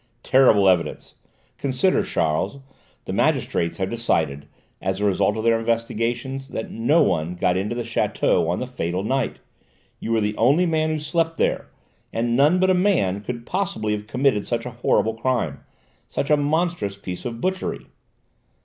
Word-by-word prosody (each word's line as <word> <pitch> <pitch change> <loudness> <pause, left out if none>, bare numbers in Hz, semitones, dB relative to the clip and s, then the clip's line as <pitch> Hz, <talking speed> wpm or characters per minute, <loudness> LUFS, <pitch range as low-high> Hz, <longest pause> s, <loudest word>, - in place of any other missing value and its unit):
"Terrible 120 -7 +5
evidence! 85 -5 +1 0.5
Consider, 140 +7 +2
Charles: 80 - -1 0.5
the - - -4
magistrates 85 0 0
have 95 0 -2
decided, 80 -11 -1 0.3
as 95 +1 -2
a 105 - 0
result 100 +1 +2
of 110 - -3
their 115 0 +3
investigations, 115 +3 -2
that 110 - -5
no 145 +9 +3
one 85 - 0
got 90 0 +1
into 100 +5 -1
the 120 - -2
château 115 -7 +1
on 90 - 0
the - - -3
fatal 95 -7 -3
night; 130 +3 -1 0.6
you 115 - -4
were 115 - +3
the 105 0 -1
only 140 +10 +4
man 160 -2 +1
who 155 - 0
slept 165 +2 -1
there; - - 0 0.4
and 115 +1 0
none 150 +7 +4
but 185 0 +4
a - - +5
man 180 - +2
could 120 +2 -6
possibly 185 - -1
have 105 0 -5
committed 125 -3 +1
such 115 -1 -2
a 125 - -5
horrible 115 -1 +1
crime, 115 - -1 0.5
such 140 - -2
a - - +7
monstrous 150 - 0
piece 90 -3 -7
of 120 -2 -5
butchery!" 185 +6 -2
115 Hz, 165 wpm, -23 LUFS, 100-140 Hz, 0.6 s, a